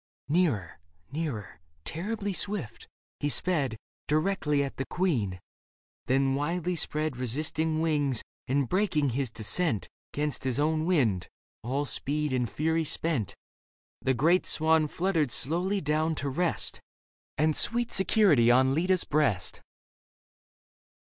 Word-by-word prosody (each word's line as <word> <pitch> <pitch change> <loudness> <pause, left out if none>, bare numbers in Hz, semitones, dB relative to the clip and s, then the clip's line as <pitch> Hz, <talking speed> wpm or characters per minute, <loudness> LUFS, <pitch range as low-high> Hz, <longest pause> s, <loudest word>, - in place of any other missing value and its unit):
Leda - - -1 0.2
Nearer, 95 - -6 0.3
nearer, 135 - -4 0.3
terribly 205 +4 -3
swift, 200 - -4 0.3
he 145 - 0
sped 145 -8 +2 0.3
Directly 150 -2 +1
at 135 - -6
the 135 - -2
queen; 120 - -1 0.7
then 135 +1 +2
widely 170 +5 -1
spread 155 -4 -2
Resisting 155 +5 -1
wings, 145 -6 +1 0.2
and 135 0 +1
breaking 160 - +1
his 130 +1 -1
descent 115 - 0 0.2
'Gainst 150 0 -1
his 130 0 -1
own 155 +2 +1
wind, 115 - +1 0.3
all 135 +5 -2
speed 150 +1 -1
and 125 -3 0
fury 160 +9 0
spent, 150 - -1 0.7
The 130 - +1
great 165 +9 +3
swan 160 0 +3
fluttered 165 -3 0
slowly 175 - 0
down 155 +2 0
to 140 -1 -2
rest 170 +5 -1 0.6
And 155 +1 +2
sweet 240 +1 +2
security 190 - +4
on 130 +2 +4
Leda's 180 +4 +2
breast. 135 - 0
150 Hz, 125 wpm, -28 LUFS, 130-165 Hz, 0.7 s, security